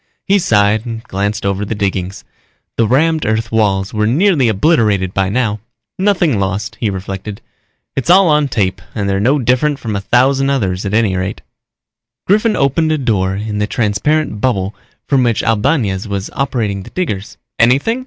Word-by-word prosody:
_ - - -46 0.2
He 200 +1 +3
sighed 105 - +2
and 115 -2 -6
glanced 100 0 -3
over 100 +1 -1
the 105 +2 -3
diggings. 95 -2 -3 0.5
The 115 - +2
rammed 155 +6 +2
earth 110 0 -1
walls 100 -3 +1
were 105 -1 +1
nearly 150 - +3
obliterated 105 - +2
by 95 -1 0
now. 110 -1 0 0.4
Nothing 180 - +2
lost, 100 +4 -2
he 110 - 0
reflected. 95 +1 -6 0.6
It's 135 - -2
all 185 +1 +6
on 150 -2 +3
tape 100 -8 -1
and 100 -2 -2
they're 95 0 0
no 130 +8 +2
different 130 +3 +1
from 110 -6 -4
a 100 - -2
thousand 135 +5 +2
others 100 -8 -1
at 100 - -1
any 110 -4 +2
rate. 95 +3 -3 0.8
Griffin 210 +3 +2
opened 150 +4 +1
a 155 - +1
door 100 -8 0
in 105 +1 -4
the 105 - 0
transparent 110 +3 0
bubble 100 -6 0 0.3
from 135 -2 +2
which 120 -3 +1
Albañez 110 -4 0
was 100 -1 -4
operating 115 -7 -2
the - - -11
diggers. 105 - -4 0.2
"Anything?" 135 - +3
110 Hz, 175 wpm, -15 LUFS, 100-135 Hz, 0.8 s, all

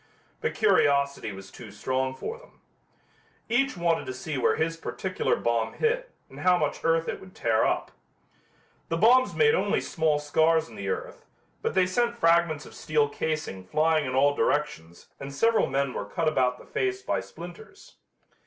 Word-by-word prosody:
But - - -2
curiosity 140 - +2
was 95 0 -10
too 110 -4 -11
strong 130 +5 -2
for 455 - -6
them. - - -20 0.9
Each 260 0 +1
wanted 170 -1 0
to 130 - -4
see 145 +4 -5
where 130 - +2
his 165 +1 -1
particular 185 +3 -2
bomb 115 -1 -1
hit - - 0 0.2
and - - -13
how 180 -1 +4
much 150 -4 -1
earth 165 0 +2
it - - -3
would 185 -1 -14
tear 115 -2 +2
up. - - -1 1.0
The 165 - 0
bombs 250 +7 +4
made 450 0 +4
only 485 - +1
small 160 -3 0
scars 160 +2 +2
in - - -14
the - - -5
earth, 470 +2 -5 0.3
but 455 - -2
they 185 - +4
sent 235 +5 0
fragments 165 -5 +2
of - - -13
steel 150 -2 0
casing 150 -11 -3
flying 155 - +1
in 130 - -3
all 145 +2 +4
directions 125 - -2
and 135 0 -7
several 225 +11 +2
men 135 -1 -1
were 100 - -4
cut 160 +10 -2
about 125 -5 +2
the - - -15
face 390 0 -2
by - - 0
splinters. 445 - -12
155 Hz, 175 wpm, -27 LUFS, 135-190 Hz, 1.0 s, how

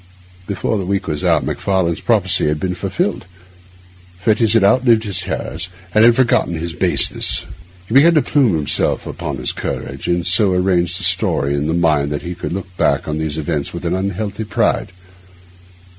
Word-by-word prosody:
Before 100 +2 -2
the 95 - -4
week 100 0 -1
was 75 -2 -4
out - - +2
Macfarlane's 95 -4 -1
prophecy 95 -7 +2
had 75 0 -1
been 90 +3 -2
fulfilled. 95 - -3 0.9
Fettes 110 +4 +2
had 115 - +3
outlived 115 +2 +3
his 100 -5 0
terrors 90 +2 -4 0.2
and 110 - +5
had 120 0 +6
forgotten 120 -8 +1
his 80 +1 -4
baseness. - - +2 0.4
He 110 - -5
began 160 +6 +6
to 150 - +4
plume 125 - +2
himself 75 -3 0
upon - - -5
his - - -2
courage, - - -5
and 85 - +1
had 85 - -4
so 95 +2 +3
arranged 90 -1 +1
the - - -4
story 70 -5 +2
in 70 +1 -1
his 80 - 0
mind 75 -4 +1
that 75 - -4
he 85 - -5
could 85 -3 -6
look 95 0 -6
back 70 -1 +1
on 75 0 -3
these 80 -1 -3
events 75 -2 -3
with - - -7
an - - 0
unhealthy 100 +3 -3
pride. 105 - -1
90 Hz, 185 wpm, -17 LUFS, 80-105 Hz, 0.9 s, had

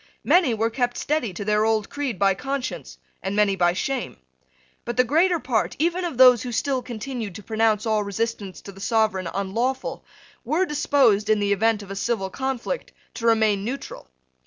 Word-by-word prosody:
Many 330 -10 +4
were 225 +1 0
kept 245 0 -1
steady 295 -8 -1
to 200 +3 -6
their 210 0 +2
old 220 -2 +1
creed 280 -7 -3
by 195 0 +3
conscience, 270 +5 -5 0.2
and 195 +1 -3
many 205 -2 +3
by 175 -1 +2
shame. 255 - -3 0.7
But 240 +1 -5
the 250 - +6
greater 335 +8 +3
part, 235 -7 -1
even 340 +4 0
of 325 -8 -4
those 250 -2 +7
who 250 - -5
still 265 +2 0
continued 235 -4 -6
to 210 - -9
pronounce 220 -1 +1
all 215 -2 +1
resistance 200 -1 -4
to 200 - -10
the 195 0 -13
sovereign 215 -6 +1
unlawful, 230 +7 -2 0.4
were 310 +10 +1
disposed, 275 - +2
in 215 -1 +4
the 200 0 +2
event 215 +1 +1
of 195 - -10
a - - -4
civil 195 -2 -2
conflict, 265 - -3 0.2
to 230 - -2
remain 220 -3 +3
neutral. 250 - -6
225 Hz, 185 wpm, -24 LUFS, 205-265 Hz, 0.7 s, those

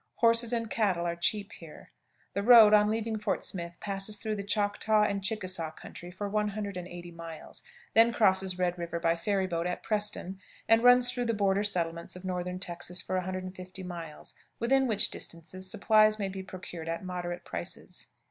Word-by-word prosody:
Horses 230 0 +3
and 230 -1 -1
cattle 195 -6 0
are 170 0 -1
cheap 200 +4 0
here. 165 -3 -13 0.4
The 200 - -1
road, 225 -1 +8
on 210 0 +6
leaving 220 0 -1
Fort 210 -1 -1
Smith, 170 -2 -5
passes 200 +1 -3
through 215 +2 -3
the 200 - -4
Choctaw 210 +1 +2
and 200 -2 -1
Chickasaw 185 -5 -2
country 175 - -10
for 190 +3 -5
180 200 -4 -3
miles, 165 -1 -9 0.3
then 230 +1 +6
crosses 190 -5 +2
Red 180 -1 0
River 170 0 -3
by 165 0 +2
ferry 190 +3 0
boat 170 -1 -2
at 180 - -4
Preston, 210 -3 -1 0.3
and 225 +1 +5
runs 245 0 +7
through 245 -1 -2
the 230 -1 0
border 200 -1 +2
settlements 170 -5 -1
of 180 +1 -10
northern 180 0 -3
Texas 175 0 -3
for 185 - -3
150 185 0 -5
miles, 170 -4 -8 0.2
within 265 +3 +2
which 215 -3 +2
distances 175 +3 -4
supplies 215 +2 +4
may 200 -2 -2
be 190 0 -6
procured 175 -3 -8
at 165 +3 -4
moderate 175 -1 -5
prices. 85 -1 -5
190 Hz, 175 wpm, -29 LUFS, 175-215 Hz, 0.4 s, road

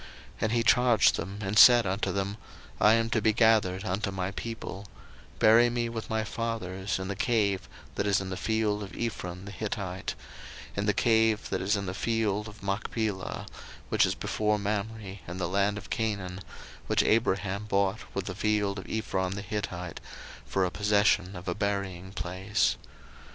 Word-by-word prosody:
01:049:029 - - -14 0.3
And 110 - +1
he 115 -1 +2
charged 120 0 +5
them, 95 +4 -5
and 100 +2 +2
said 120 -2 +9
unto 95 +2 -1
them, 100 +1 -2 0.4
I 105 - +6
am 115 0 0
to 110 - +2
be 110 0 +3
gathered 105 -4 +3
unto 100 +2 -1
my 95 0 -3
people: 100 -2 -6 0.5
bury 115 +2 +6
me 120 0 -1
with 115 -1 -6
my 110 0 0
fathers 105 -4 -3
in 95 0 -4
the 100 - -3
cave 100 -3 0 0.2
that 100 - -1
is 100 0 +3
in 95 -1 -5
the - - -2
field 110 0 0
of 100 -1 -8
Ephron 90 -5 -4
the 100 - -7
Hittite, 100 -4 -4 0.6
01:049:030 - - -19
In 100 - 0
the 105 - +4
cave 110 -2 +2
that - - -1
is 100 +3 +2
in 100 -1 -2
the 95 - -3
field 105 0 0
of 105 -1 -12
Machpelah, 100 0 -2 0.4
which - - +4
is - - -1
before 105 0 0
Mamre, 105 -1 -3
in 85 +1 -6
the 90 - -1
land 100 +3 +1
of 105 - -10
Canaan, 100 -5 -2 0.5
which - - +3
Abraham 100 -2 +1
bought 100 0 +1 0.2
with 100 -1 -2
the 95 - -4
field 105 0 0
of - - -10
Ephron 95 -4 -1
the 100 - -5
Hittite 90 -4 -4 0.5
for 95 -1 +1
a 90 - -2
possession 105 -2 +2
of 90 +1 -9
a 90 - 0
buryingplace. 95 0 -1
100 Hz, 180 wpm, -28 LUFS, 95-110 Hz, 0.6 s, said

